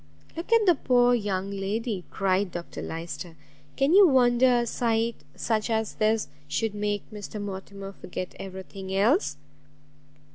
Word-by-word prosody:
"Look 335 Hz, +6 st, -6 dB
at 460 Hz, -2 st, +5 dB
the 360 Hz, -, +7 dB
poor 245 Hz, -4 st, +3 dB
young 200 Hz, -4 st, -1 dB
lady!" 200 Hz, 0 st, -2 dB
cried 190 Hz, 0 st, +1 dB
Dr 170 Hz, 0 st, -6 dB
Lyster; 165 Hz, +1 st, -6 dB, 0.4 s
"can 275 Hz, +4 st, +2 dB
you 395 Hz, 0 st, +9 dB
wonder 250 Hz, -2 st, +4 dB
a -, -, -1 dB
sight 230 Hz, 0 st, 0 dB, 0.2 s
such 220 Hz, 0 st, -1 dB
as 220 Hz, -1 st, 0 dB
this 215 Hz, 0 st, +1 dB, 0.2 s
should 225 Hz, -2 st, -1 dB
make 205 Hz, -1 st, -1 dB
Mr 210 Hz, 0 st, -7 dB
Mortimer 195 Hz, 0 st, -6 dB
forget 180 Hz, -1 st, -6 dB
every 190 Hz, 0 st, -7 dB
thing 190 Hz, 0 st, -8 dB
else?" 240 Hz, -, +2 dB
215 Hz, 145 wpm, -27 LUFS, 195-245 Hz, 0.4 s, you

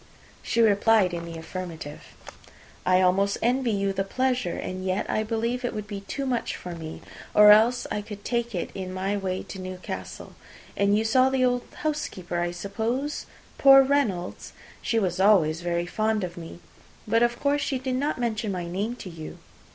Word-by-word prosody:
She 235 Hz, -, +1 dB
replied 210 Hz, -3 st, +4 dB
in 170 Hz, -1 st, -4 dB
the 165 Hz, -1 st, -7 dB
affirmative. 165 Hz, -3 st, -7 dB, 0.9 s
"I 185 Hz, 0 st, +5 dB
almost 195 Hz, +2 st, +2 dB
envy 250 Hz, +1 st, +2 dB
you 200 Hz, -2 st, 0 dB
the 195 Hz, -, -1 dB
pleasure, 250 Hz, -2 st, -1 dB
and 185 Hz, 0 st, -5 dB
yet 185 Hz, 0 st, -1 dB
I 215 Hz, -, 0 dB
believe 230 Hz, +3 st, -2 dB
it 245 Hz, -, -2 dB
would 210 Hz, -1 st, -4 dB
be 205 Hz, -2 st, -6 dB
too 200 Hz, +8 st, -4 dB
much 250 Hz, -3 st, -1 dB
for 180 Hz, -, -7 dB
me, 160 Hz, -1 st, -8 dB, 0.3 s
or 210 Hz, 0 st, +9 dB
else 225 Hz, +4 st, +5 dB
I 210 Hz, -, -1 dB
could 205 Hz, -1 st, -10 dB
take 235 Hz, -2 st, -1 dB
it 175 Hz, -, -3 dB
in 185 Hz, -1 st, -5 dB
my 195 Hz, +2 st, -1 dB
way 190 Hz, -2 st, -2 dB
to 190 Hz, -, -8 dB
Newcastle. 185 Hz, 0 st, -7 dB, 0.4 s
And 200 Hz, +1 st, +3 dB
you 220 Hz, -, 0 dB
saw 255 Hz, +4 st, +4 dB
the 265 Hz, -1 st, +2 dB
old 245 Hz, -1 st, 0 dB, 0.2 s
housekeeper, 190 Hz, -, -2 dB
I 175 Hz, 0 st, 0 dB
suppose? 220 Hz, +10 st, -3 dB, 0.3 s
Poor 270 Hz, 0 st, +9 dB
Reynolds, 250 Hz, -11 st, -1 dB, 0.3 s
she 230 Hz, -, 0 dB
was 185 Hz, -4 st, 0 dB
always 175 Hz, -5 st, +4 dB
very 175 Hz, 0 st, -1 dB
fond 215 Hz, +3 st, 0 dB
of 175 Hz, -1 st, -5 dB
me. 170 Hz, 0 st, -9 dB, 0.5 s
But 230 Hz, +2 st, +3 dB
of 240 Hz, 0 st, +2 dB
course 290 Hz, 0 st, +1 dB
she 275 Hz, -1 st, -1 dB
did 260 Hz, 0 st, -3 dB
not 285 Hz, +4 st, -1 dB
mention 225 Hz, -3 st, -1 dB
my 180 Hz, -2 st, -3 dB
name 200 Hz, +7 st, -3 dB
to 195 Hz, -, -9 dB
you." 160 Hz, -2 st, -9 dB
205 Hz, 185 wpm, -26 LUFS, 185-240 Hz, 0.9 s, or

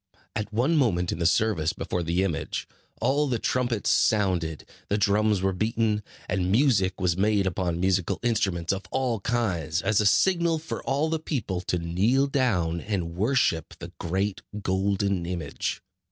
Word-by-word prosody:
At 105 Hz, 0 st, -3 dB
one 125 Hz, +10 st, +2 dB
moment 90 Hz, -, +2 dB
in -, -, -4 dB
the 85 Hz, -, +3 dB
service 85 Hz, -4 st, +1 dB
before 90 Hz, -, -3 dB
the 85 Hz, +3 st, 0 dB
image, 90 Hz, -5 st, -3 dB, 0.3 s
all 140 Hz, +5 st, +2 dB
the 125 Hz, -3 st, 0 dB
trumpets 120 Hz, -2 st, 0 dB
sounded, 90 Hz, -7 st, +1 dB, 0.2 s
the 105 Hz, -, +1 dB
drums 105 Hz, -1 st, +2 dB
were 95 Hz, 0 st, +2 dB
beaten, 110 Hz, +2 st, 0 dB, 0.3 s
and 90 Hz, 0 st, 0 dB
music 105 Hz, -7 st, +3 dB
was 90 Hz, -2 st, +1 dB
made 100 Hz, +1 st, +2 dB
upon 90 Hz, -2 st, -1 dB
musical 95 Hz, -1 st, +1 dB
instruments 95 Hz, -7 st, 0 dB
of 95 Hz, -, -3 dB
all 125 Hz, -3 st, 0 dB
kinds, 95 Hz, -8 st, -1 dB
as 105 Hz, -1 st, +3 dB
a 105 Hz, -, +3 dB
signal 170 Hz, -, +3 dB
for 160 Hz, +1 st, -5 dB
all 145 Hz, +3 st, +1 dB
the 160 Hz, -, 0 dB
people 110 Hz, -, -3 dB
to 90 Hz, -1 st, -1 dB
kneel 95 Hz, +11 st, +2 dB
down 110 Hz, -, 0 dB
and 90 Hz, -6 st, -3 dB
worship 90 Hz, -, +1 dB
the 85 Hz, +1 st, -9 dB
great 95 Hz, +3 st, -1 dB, 0.2 s
golden 95 Hz, -1 st, 0 dB
image. 85 Hz, -5 st, -4 dB
100 Hz, 160 wpm, -26 LUFS, 90-115 Hz, 0.3 s, the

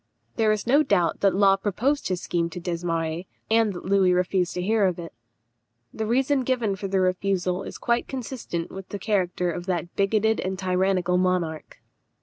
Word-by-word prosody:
There 220 Hz, -2 st, +3 dB
is 215 Hz, -1 st, -1 dB
no 275 Hz, +5 st, +5 dB
doubt 180 Hz, -, +1 dB
that 195 Hz, -2 st, +3 dB
Law 195 Hz, 0 st, +5 dB
proposed 240 Hz, +9 st, 0 dB
his 185 Hz, -2 st, -2 dB
scheme 170 Hz, -1 st, -1 dB
to 175 Hz, -, -7 dB
Desmarets, 170 Hz, -1 st, -2 dB, 0.2 s
and 225 Hz, -1 st, +4 dB
that 175 Hz, -, -8 dB
Louis 190 Hz, -1 st, +3 dB
refused 180 Hz, 0 st, 0 dB
to 180 Hz, -, -2 dB
hear 215 Hz, +1 st, +2 dB
of 180 Hz, -, -2 dB
it. 170 Hz, -1 st, -8 dB, 0.8 s
The 220 Hz, -, -3 dB
reason 265 Hz, +4 st, +2 dB
given 240 Hz, -6 st, 0 dB
for 195 Hz, +1 st, -5 dB
the 190 Hz, 0 st, +1 dB
refusal 185 Hz, 0 st, 0 dB
is -, -, -7 dB
quite 235 Hz, 0 st, 0 dB
consistent 240 Hz, -9 st, -5 dB
with 195 Hz, -1 st, -9 dB
the 205 Hz, -, -4 dB
character 180 Hz, -3 st, 0 dB
of 175 Hz, +2 st, -6 dB
that 175 Hz, -2 st, -2 dB
bigoted 215 Hz, +2 st, +2 dB
and 190 Hz, 0 st, -2 dB
tyrannical 185 Hz, -1 st, +1 dB
monarch. 180 Hz, -4 st, -2 dB
190 Hz, 180 wpm, -25 LUFS, 180-215 Hz, 0.8 s, no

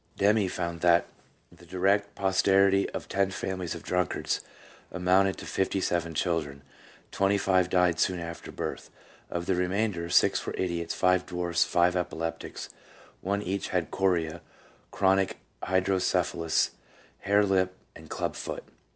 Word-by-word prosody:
Demme 100 Hz, -1 st, +3 dB
found 85 Hz, -2 st, -4 dB
that 85 Hz, -1 st, +4 dB, 0.5 s
the -, -, -18 dB
direct 100 Hz, +2 st, 0 dB
posterity 95 Hz, 0 st, +3 dB
of -, -, -6 dB
ten 100 Hz, 0 st, +1 dB
families 95 Hz, -2 st, -4 dB
of -, -, -9 dB
drunkards 90 Hz, -1 st, -1 dB, 0.5 s
amounted 95 Hz, +2 st, +2 dB
to -, -, -8 dB
fifty 95 Hz, 0 st, -1 dB
seven 85 Hz, -3 st, -1 dB
children; 75 Hz, -5 st, -1 dB, 0.5 s
twenty 100 Hz, +1 st, +2 dB
five 95 Hz, -2 st, +2 dB
died 90 Hz, -2 st, +2 dB
soon 90 Hz, -, +2 dB
after 85 Hz, 0 st, -7 dB
birth; -, -, -5 dB, 0.4 s
of 85 Hz, 0 st, -3 dB
the 95 Hz, -, +1 dB
remainder, 90 Hz, -1 st, -1 dB
six -, -, +3 dB
were -, -, -4 dB
idiots, 85 Hz, -2 st, -2 dB
five 90 Hz, 0 st, +2 dB
dwarfs, 90 Hz, -2 st, +1 dB
five 90 Hz, +1 st, +2 dB
epileptics, 80 Hz, -2 st, -4 dB, 0.5 s
one 100 Hz, +2 st, -1 dB
each 95 Hz, +1 st, -2 dB
had 90 Hz, -3 st, -1 dB
chorea, 85 Hz, -4 st, 0 dB, 0.5 s
chronic 95 Hz, 0 st, +2 dB, 0.2 s
hydrocephalus, 95 Hz, -3 st, +1 dB, 0.5 s
hair 100 Hz, +1 st, +3 dB
lip, 95 Hz, -1 st, +1 dB, 0.2 s
and -, -, -13 dB
club -, -, -3 dB
foot. -, -, -5 dB
90 Hz, 135 wpm, -28 LUFS, 85-95 Hz, 0.5 s, that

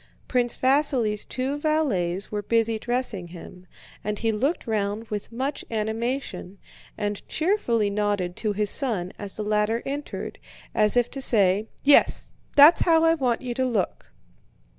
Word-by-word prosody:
Prince 245 Hz, -2 st, 0 dB
Vasíli's 255 Hz, -6 st, +2 dB
two 265 Hz, +3 st, -3 dB
valets 205 Hz, -, 0 dB
were 210 Hz, -1 st, -2 dB
busy 225 Hz, +1 st, +1 dB
dressing 240 Hz, -6 st, -2 dB
him, 180 Hz, +1 st, -12 dB, 0.4 s
and 210 Hz, 0 st, -2 dB
he 225 Hz, +1 st, 0 dB
looked 270 Hz, +10 st, -1 dB
round 210 Hz, -1 st, -2 dB
with 210 Hz, +1 st, -5 dB
much 270 Hz, +4 st, -3 dB
animation 220 Hz, -3 st, -3 dB, 0.4 s
and 205 Hz, -1 st, -3 dB
cheerfully 250 Hz, -, 0 dB
nodded 200 Hz, -4 st, -1 dB
to 215 Hz, -, -1 dB
his 205 Hz, 0 st, -1 dB
son 210 Hz, -10 st, 0 dB
as 200 Hz, -2 st, -5 dB
the 215 Hz, -, -3 dB
latter 210 Hz, +2 st, 0 dB
entered, 285 Hz, +2 st, -5 dB, 0.3 s
as 215 Hz, +2 st, +3 dB
if 240 Hz, -1 st, +2 dB
to 270 Hz, -, -4 dB
say: 205 Hz, -3 st, +3 dB, 0.2 s
"Yes, 285 Hz, 0 st, +4 dB, 0.2 s
that's 295 Hz, +4 st, +8 dB
how 325 Hz, -1 st, +4 dB
I 325 Hz, 0 st, +5 dB
want 255 Hz, -6 st, -1 dB
you 245 Hz, -1 st, -3 dB
to 260 Hz, +2 st, 0 dB
look." 220 Hz, -6 st, -2 dB
225 Hz, 150 wpm, -25 LUFS, 205-265 Hz, 0.4 s, that's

